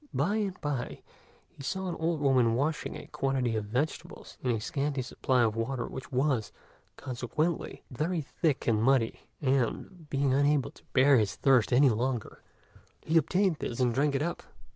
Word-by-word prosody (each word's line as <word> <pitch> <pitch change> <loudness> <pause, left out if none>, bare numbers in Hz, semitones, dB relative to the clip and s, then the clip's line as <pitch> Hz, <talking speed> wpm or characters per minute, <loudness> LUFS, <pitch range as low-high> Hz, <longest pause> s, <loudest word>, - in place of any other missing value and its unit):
By 180 +10 +1
and 195 -4 -2
by 145 -4 -3 0.4
he - - -15
saw 190 +6 -3
an 175 - -2
old 160 -1 0
woman 130 -5 +3
washing 145 +5 -1
a - - -8
quantity 130 -4 -1
of 110 -1 -2
vegetables 125 +9 -4
in 125 - -1
a 115 -2 +1
scanty 140 +3 -2
supply 125 0 +1
of 110 -2 +1
water 120 +2 -2
which 130 - -8
was, 130 -4 0 0.5
consequently, 135 +7 -3
very 160 +6 -1
thick 150 0 -1
and 110 -2 +2
muddy; 125 -2 +2 0.2
and, 140 +6 -1
being 140 -1 +1
unable 145 0 +2
to - - -20
bear 135 0 +6
his 105 -2 0
thirst 130 -5 +3
any 135 +3 +6
longer, 120 +1 -2 0.6
he 160 - -1
obtained 180 +2 +3
this 120 - -4
and 125 -2 +2
drank 140 +3 +1
it 135 - +1
up. 170 +2 -3
135 Hz, 170 wpm, -29 LUFS, 125-150 Hz, 0.6 s, bear